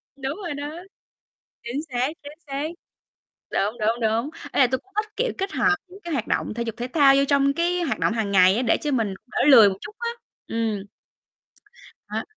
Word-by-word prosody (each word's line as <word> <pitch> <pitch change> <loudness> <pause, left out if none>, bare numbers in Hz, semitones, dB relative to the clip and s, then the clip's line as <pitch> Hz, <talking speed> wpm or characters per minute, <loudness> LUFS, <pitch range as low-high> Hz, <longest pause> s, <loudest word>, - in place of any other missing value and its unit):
Đúng 275 +2 -4
rồi 350 -7 -5
đó. 290 +2 -5 0.9
Chính 240 +4 -3
xác, 245 +2 +1
chính 290 0 -9
xác. 280 +2 -3 0.8
Đúng, 210 +4 -1
đúng, 225 +3 +1
đúng. 225 +5 0 0.2
Ý - - +1
là 255 - +7
tui 255 +1 -1
cũng 390 - -29
thích 430 0 -1
kiểu 485 +2 0
kết 390 +1 -2
hợp 405 - +3
những 385 +2 -14
cái 345 -3 -6
hoạt 255 -7 -1
động - - -1
thể 235 - -2
dục 225 -2 -4
thể 245 +1 -3
thao 280 -4 +6
vô 275 - +4
trong 280 -1 +3
cái 350 +2 0
hoạt 315 - -1
động - - +1
hàng 220 -3 -1
ngày 185 +1 +6
á, 245 - +1
để 230 - +3
cho 300 - -2
mình 225 -7 0
đỡ - - -5
lười 240 -8 +9
một 190 - -2
chút - - -9
á, 470 0 -2 0.4
ừm. 220 -3 -2 1.3
Đó, - - -2
270 Hz, 215 wpm, -24 LUFS, 225-310 Hz, 1.3 s, lười